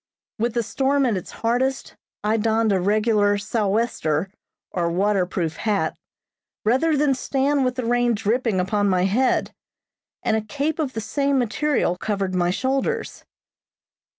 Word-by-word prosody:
With 235 +1 0
the 235 - +1
storm 270 +5 +1
at 235 -4 +1
its 185 - -5
hardest, 245 +3 -1 0.3
I 215 +1 +2
donned 220 0 +2
a 190 - +2
regular 205 +1 +2
"sou'wester," 200 -5 -1 0.4
or 170 -2 0
water 190 +1 +1
proof 165 -3 -3
hat, 210 -3 0 0.7
rather 285 +8 +3
than 285 -1 +3
stand 270 +2 0
with 255 -1 0
the 255 -2 -3
rain 240 0 +2
dripping 225 -1 0
upon 205 +2 +1
my 180 -1 +2
head, 230 +7 +1 0.7
and 220 - +2
a 220 - +1
cape 285 +8 -2
of 285 -4 -1
the 225 - -3
same 275 +5 0
material 245 -5 0
covered 195 -2 -2
my 175 -1 +1
shoulders. 260 +8 -2
225 Hz, 150 wpm, -23 LUFS, 200-260 Hz, 0.7 s, rather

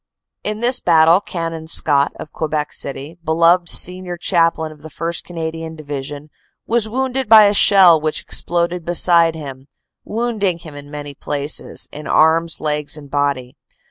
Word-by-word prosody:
In 215 +1 -3
this 245 +2 +2
battle 165 +1 +4
Canon 165 -4 -6
Scott 145 -3 0
of - - -9
Quebec 155 -1 -3
City, 140 +4 -5
beloved 170 +2 +3
senior 180 0 +1
chaplain 165 -3 +1
of 150 -1 -16
the 160 - -10
1st. 165 +2 -5
Canadian 165 -1 -6
Division, 145 0 -7 0.3
was 230 -2 0
wounded 260 0 -2
by 220 -1 +9
a 205 0 +3
shell 185 -6 +6
which 155 0 -1
exploded 170 0 -1
beside 170 -1 +3
him, 135 -3 -9 0.4
wounding 215 -5 -1
him 165 -3 -12
in 145 0 -11
many 145 -1 -8
places, 145 +1 -3
in 150 +1 -8
arms, 165 +1 +2
legs 150 0 -2
and 145 -2 -13
body. 140 -3 -2
165 Hz, 150 wpm, -18 LUFS, 150-180 Hz, 0.4 s, by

